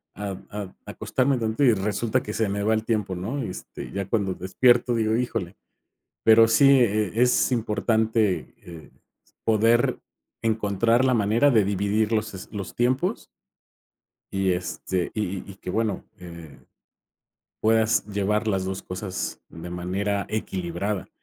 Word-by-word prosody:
a 100 0 -4 0.2
a 100 -2 -7
acostarme 130 +1 0
tantito". 110 +3 -1
Y 125 -4 +6
resulta 105 +3 0
que 105 - -6
se 110 -2 0
me 100 +1 -2
va 110 +2 +2
el 110 0 0
tiempo, 105 -5 -1
¿no?, 110 +11 -3
este, 95 -7 -7
ya 100 -1 -3
cuando 100 -4 0
despierto, 120 +7 +3
digo: 110 -1 +1
"Híjole". 115 -7 -2 0.7
Pero 115 0 +7
sí, 135 +5 +5
eh, 110 -6 +4
eh, - - -12
es 125 +2 +3
importante, 110 -2 0
eh, 85 -2 -12 0.5
poder 115 +2 +3 0.4
encontrar 115 +2 +2
la 130 -1 +3
manera 115 +5 +3
de 110 -4 +4
dividir 100 +2 0
los 110 -1 -1
es 95 - -9
los 100 -3 -5
tiempos. 130 - 0 1.1
Y, 95 -1 +1
este, 90 0 -3
y 110 - 0 0.2
y - - -9
y - - -13
que, 90 - -7
bueno, 110 -2 -1
eh, 85 -6 -11 1.0
puedas 110 0 +2
llevar 105 +1 -1
las 95 -3 0
2 95 0 -4
cosas 95 0 -5
de 80 +2 -9
manera 95 +3 -2
equilibrada, 95 -1 -3
105 Hz, 145 wpm, -25 LUFS, 95-115 Hz, 1.1 s, Pero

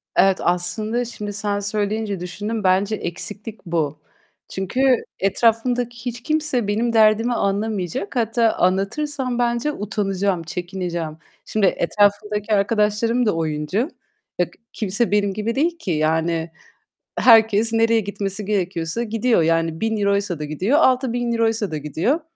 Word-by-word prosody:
Evet, 195 -1 +4
aslında 215 +7 0
şimdi 210 -3 -6
sen 205 0 -2
söyleyince 205 0 -2
düşündüm. 205 +5 -4
Bence 195 +3 +2
eksiklik 210 +4 -7
bu. 155 -3 -1 0.5
Çünkü 190 +7 -2 0.4
etrafımdaki 235 +4 +1
hiç 240 -1 -4
kimse 300 -8 0
benim 230 +3 0
derdimi 220 +2 +4
anlamayacak. 200 -2 -2
Hatta 230 -1 +2
anlatırsam 245 +8 0
bence 240 +4 +1
utanacağım, 195 - -1
çekineceğim. 175 -2 -4 0.3
Şimdi 215 -2 +1
etrafımdaki 205 +3 +1
arkadaşlarım 210 +3 +2
da 210 - +1
oyuncu. 160 - -1 0.5
Bak, 180 - +3 0.3
kimse 215 +2 -1
benim 205 -1 +2
gibi 215 +3 -2
değil 330 +5 +1
ki. 195 - -4
Yani, 160 +1 0 0.7
herkes 225 -1 +5
nereye 225 0 +3
gitmesi 200 0 -4
gerekiyorsa 185 0 -1
gidiyor. 225 -2 +1
Yani 165 0 +1
€1000'ysa 200 -5 0
da 150 - -4
gidiyor, 185 - +1
€6000'ysa 235 - +1
da 155 - -3
gidiyor. 165 - 0
210 Hz, 120 wpm, -21 LUFS, 185-230 Hz, 0.7 s, herkes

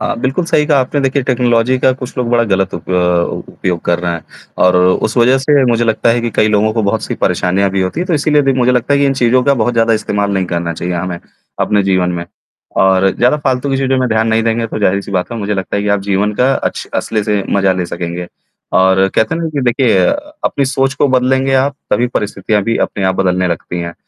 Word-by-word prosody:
अ, - - -1
बिल्कुल 135 +8 -1
सही 150 -2 +2
कहा 145 -3 +3
आपने, 135 +3 -1
देखिए 135 0 0
टेक्नोलॉज़ी 125 0 +1
का 130 - +3
कुछ 125 -1 -8
लोग 125 -2 -1
बड़ा 120 -1 +3
गलत 95 -1 0
उप 85 - -7
अ, - - +1 0.6
उपयोग 90 -2 -2
कर 85 0 +1
रहे 85 -1 -2
हैं 85 - -5 0.4
और 90 0 +4
उस 90 +6 +1
वजह 125 +3 +4
से 140 0 +2
मुझे 120 0 +1
लगता 110 +1 +1
है 120 +1 +1
कि 120 0 -2
कई 110 - +3
लोगों 110 +1 +2
को 110 0 -1
बहुत 100 - -1
सी - - -4
परेशानियाँ 95 +2 0
भी 95 0 -1
होती 95 - -3
है, 180 - -2
तो 175 - 0
इसीलिए 150 0 +2
भी 135 0 +2
मुझे 125 -1 +2
लगता 125 +3 +1
है 140 - +2
कि 140 - +3
इन 135 - +2
चीज़ों 125 0 +2
का 140 - +3
बहुत 120 -1 0
ज़्यादा 115 0 +2
इस्तेमाल 105 -1 -1
नहीं 95 -1 0
करना 85 -1 -2
चाहिए 90 +2 -4
हमें 90 0 -3 0.4
अपने 105 -1 +2
जीवन 95 -2 +1
में। 85 0 -4 0.6
और 95 0 +3
ज़्यादा 125 +5 +3
फालतू 130 +1 0
की 135 - +1
चीज़ों 135 -1 0
में 125 - 0
ध्यान 110 0 +1
नहीं 110 0 +2
देंगे 115 0 0
तो 110 - -5
जाहिर-सी 100 -1 0
बात 90 +3 -2
है 115 - -4
मुझे 105 0 -2
लगता 95 0 -3
है 100 - -1
कि 105 - -2
आप 100 -1 +1
जीवन 100 +1 0
का 130 +5 +2
अच्छ - - -3
असली 110 -2 -1
से 105 -2 0
मजा 95 -1 +2
ले 90 -2 -3
सकेंगे, 85 +1 -5 0.5
और 95 0 +4
कहते 110 +7 +1
हैं 165 - -3
ना 165 - -1
कि 140 - 0
देखिए 125 -1 +2
अ, 295 +1 -2
अपनी 140 - 0
सोच 135 0 0
को 140 +1 +1
बदलेंगे 130 +1 +1
आप, 135 +2 +1 0.2
तभी 120 - +2
परिस्थितियाँ 105 0 -1
भी 115 - 0
अपने 100 - -5
आप 95 0 +1
बदलने 90 -1 +1
लगती 85 +1 -4
हैं। 85 0 -5
110 Hz, 250 wpm, -14 LUFS, 95-130 Hz, 0.6 s, और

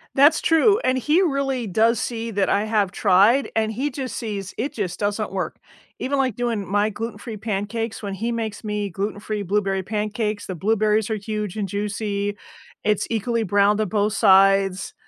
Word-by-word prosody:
That's 290 +3 +5
true, 400 +6 +4
and 255 0 +2
he 300 +8 +2
really 270 - 0
does 225 +4 +3
see 230 0 -3
that 200 -1 0
I 205 +2 +2
have 210 -4 +1
tried, 205 +8 +4
and 220 0 +1
he 270 +7 -2
just 260 -1 -5
sees 205 -4 -5
it 270 +6 -2
just 185 -5 -3
doesn't 205 -1 -1
work. 190 -1 -3 0.4
Even, 280 +2 -1
like, 260 -5 +1
doing 230 -5 -2
my 205 +1 +2
gluten-free 220 +1 -6
pancakes, 220 +2 -3
when 200 -1 -3
he 230 +4 -2
makes 220 -2 -3
me 210 -1 -2
gluten-free 205 +2 -3
blueberry 195 0 0
pancakes, 210 +1 -2
the 185 - -4
blueberries 215 +3 +1
are 220 - 0
huge 210 -1 -4
and 210 -2 -2
juicy, 205 0 -2 0.5
it's 210 -1 +1
equally 230 0 0
browned 205 +2 +3
on 215 - 0
both 210 0 +1
sides 195 -2 +4
210 Hz, 175 wpm, -22 LUFS, 200-230 Hz, 0.5 s, That's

